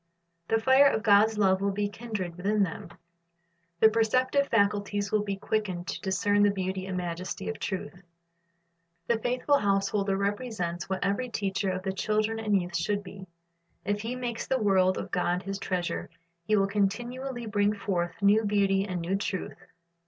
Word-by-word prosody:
The 225 - +2
fire 265 +4 +6
of 220 -5 0
God's 215 0 +5
love 190 -2 +3
will 200 - +1
be 205 +1 -1
kindled 205 -5 -5
within 200 +3 +1
them. 170 -2 -5 0.9
Their 220 - +6
perceptive 255 +5 +2
faculties 205 -1 +1
will 215 - +3
w, 205 -1 -2
be - - -17
quickened 195 -5 -2
to - - -4
discern 205 +2 +1
the 205 - +5
beauty 190 -1 -3
and 185 -1 -3
majesty 175 - -4
of - - -5
truth. 180 -3 -5 1.0
The 230 +4 +1
faithful 250 +5 +1
house 195 -1 +1
holder 195 -2 0
represents 200 -4 -3
what 190 -1 -2
every 200 +6 -1
teacher 195 -3 -1
of 185 0 -3
the 190 -1 -2
children 215 +3 0
and 210 -3 +2
youth 175 -1 -5
should 200 +5 0
be. 190 0 -10 0.6
If 205 0 -1
he 230 +3 -3
makes 245 -2 -4
the 265 - +1
word 190 -4 +3
of - - -5
God 180 +1 0
his 195 0 -4
treasure, 180 -3 -3 0.4
he 215 - +3
will 195 -1 +3
continually 240 +6 -2
bring 205 -1 +1
forth 195 -3 -3
new 210 +2 +5
beauty 200 -2 +2
and 180 -3 -3
new 175 +3 -1
truth. 195 -1 -4
200 Hz, 175 wpm, -28 LUFS, 190-220 Hz, 1.0 s, fire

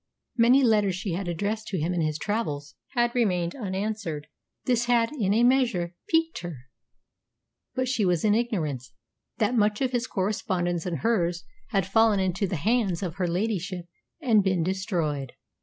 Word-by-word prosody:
Many 250 +3 +5
letters 210 -5 +3
she 190 +1 -3
had 185 +2 -3
addressed 205 +6 -2
to 190 - -2
him 165 +3 0
in 175 - 0
his 155 -1 0
travels 150 -7 -3 0.2
had 240 -1 +2
remained 180 -8 +1
unanswered. 195 - -3 0.4
This 240 -2 +2
had, 235 -1 +3
in 220 -10 0
a 225 +3 +3
measure, 240 -9 +2 0.2
piqued 325 0 +2
her. 175 -4 -6 1.2
But 255 0 0
she 245 -4 +1
was 180 0 +2
in 210 - +4
ignorance 160 - -1 0.4
that 215 +1 +1
much 210 -3 +2
of 260 -2 0
his 245 0 -1
correspondence 180 -3 -1
and 170 -2 -3
hers 175 -7 +1 0.2
had 195 -3 0
fallen 215 +1 +4
into 190 +1 0
the 180 - -2
hands 200 +1 +1
of 180 0 -4
her 180 -2 0
ladyship 185 -1 -2 0.3
and 230 -9 +4
been 185 -3 +1
destroyed. 170 - -2
195 Hz, 165 wpm, -26 LUFS, 175-230 Hz, 1.2 s, Many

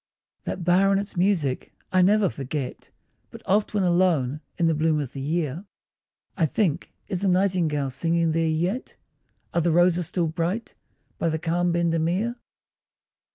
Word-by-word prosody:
That 180 - -4
bower 180 +3 +4
and 195 0 +3
its 200 +1 -5
music 175 -8 0 0.2
I 185 - +4
never 205 +2 +4
forget, 140 -3 -5 0.4
But - - -12
oft 210 +2 +1
when 200 - +2
alone 170 -6 +2 0.2
in 170 - +2
the 165 - +3
bloom 155 0 +1
of 140 -4 -4
the 135 - -6
year, 155 +2 -2 0.7
I 165 -4 +2
think 170 -1 -1 0.2
is 185 -3 -2
the 200 - +1
nightingale 180 -7 +1
singing 165 +4 +1
there 165 +1 +1
yet? 175 +10 -2 0.6
Are 170 - +2
the 170 - +1
roses 175 0 +3
still 175 -1 0
bright 170 +7 -2 0.5
by 165 - +1
the 160 - -1
calm 170 +2 0
Bendemeer? 170 +6 0
170 Hz, 155 wpm, -25 LUFS, 155-185 Hz, 0.7 s, bower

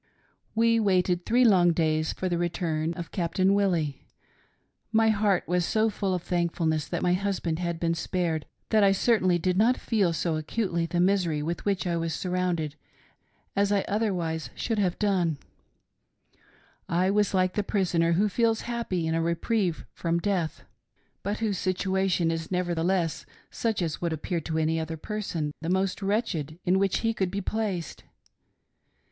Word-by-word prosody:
" - - -44
We 230 0 +4
waited 180 -4 +1
three 245 +2 +4
long 180 -6 +5
days 155 -1 +1
for 185 - -3
the 175 -1 -1
return 165 -2 -1
of 170 -2 -7
Captain 185 +2 +1
Wil 200 -1 +3
lie. 155 -6 -1 0.9
My 225 0 +4
heart 205 -3 +2
was 180 +1 +1
so 220 +4 +1
full 195 -2 -1
of 175 - -4
thankfulness 165 -3 0
that 175 - -3
my 180 - +3
husband 180 -4 -1
had 170 -2 -2
been 165 0 +1
spared 165 -2 -2 0.2
that 215 -2 +4
I 195 -1 +5
certainly 190 -4 +3
did 180 +1 0
not 235 +5 +4
feel 205 -7 +1
so 165 -1 -1
acutely 170 +1 -1
the 175 +1 -1
misery 175 -5 +2
with 170 +3 -4
which 200 -2 0
I 170 -1 0
was 165 -1 -2
surrounded 180 -4 -1 0.8
as 200 0 +2
I 200 -1 +2
otherwise 180 -7 -1
should 225 -3 -1
have 185 -3 +1
done; 180 -7 +1 1.5
I 180 +3 +2
was 205 -1 +2
like 185 -1 +2
the 210 - +1
prisoner 175 -5 +1
who 200 +5 +3
feels 225 +2 +1
happy 230 -8 -2
in 160 - 0
a 165 - +1
re 170 +1 +1
prieve 195 -4 -1
from 170 0 -1
death, 175 -3 -1 0.6
but 205 +3 -3
whose 205 -5 0
situation 190 -2 +1
is 165 -1 -4
nevertheless 175 -1 0 0.2
such 220 -5 -1
as 160 -3 -3
would 170 -2 0
appear 165 +2 -2
to 160 +1 -3
any 160 +1 +1
other 160 0 -4
person 170 -5 -3
the 165 - -3
most 190 +2 0
wretched 195 - -1
in 185 +2 +3
which 195 -1 +1
he 225 0 +1
could 190 -4 -1
be 200 +2 -3
placed. 200 -4 -3
180 Hz, 170 wpm, -27 LUFS, 165-200 Hz, 1.5 s, long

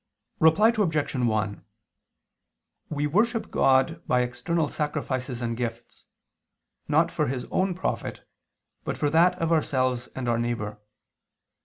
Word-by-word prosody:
Reply 205 +9 +5
Obj. 160 -9 0
1: 110 -5 -1 1.3
We 145 -1 -1
worship 220 +9 +1
God 135 +5 +3
by 125 - +3
external 145 +7 -1
sacrifices 130 -5 -3
and 115 0 -1
gifts, 120 0 -6 0.8
not - - +3
for - - 0
His 125 0 -3
own 185 -1 +1
profit, 185 - -4 0.6
but - - -3
for 145 - 0
that 170 +3 +4
of 165 0 0
ourselves 130 -6 +1
and 130 -2 -4
our 115 -1 +1
neighbor. 115 -3 -3
135 Hz, 125 wpm, -26 LUFS, 120-165 Hz, 1.3 s, Reply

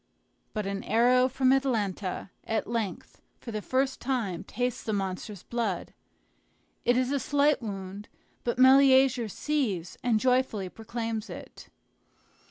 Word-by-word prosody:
But 215 -2 -2
an 195 0 -3
arrow 250 +3 +4
from 260 0 +3
Atalanta 205 -8 -1
at 220 -1 -1
length 225 -4 -4 0.2
for 235 - -8
the 215 -1 -3
first 265 +4 0
time 235 -9 -2
tastes 245 +1 -3
the 220 - -2
monster's 195 0 -4
blood. 225 -7 -3 0.9
It 245 0 +4
is 255 +1 +1
a 285 - +1
slight 290 +1 +2
wound, 200 -1 -6 0.3
but 240 - -1
Meleager 260 -2 +6
sees 215 - -2
and 230 -3 +3
joyfully 250 -6 +1
proclaims 225 +1 -4
it. - - -10
235 Hz, 130 wpm, -28 LUFS, 205-260 Hz, 0.9 s, Meleager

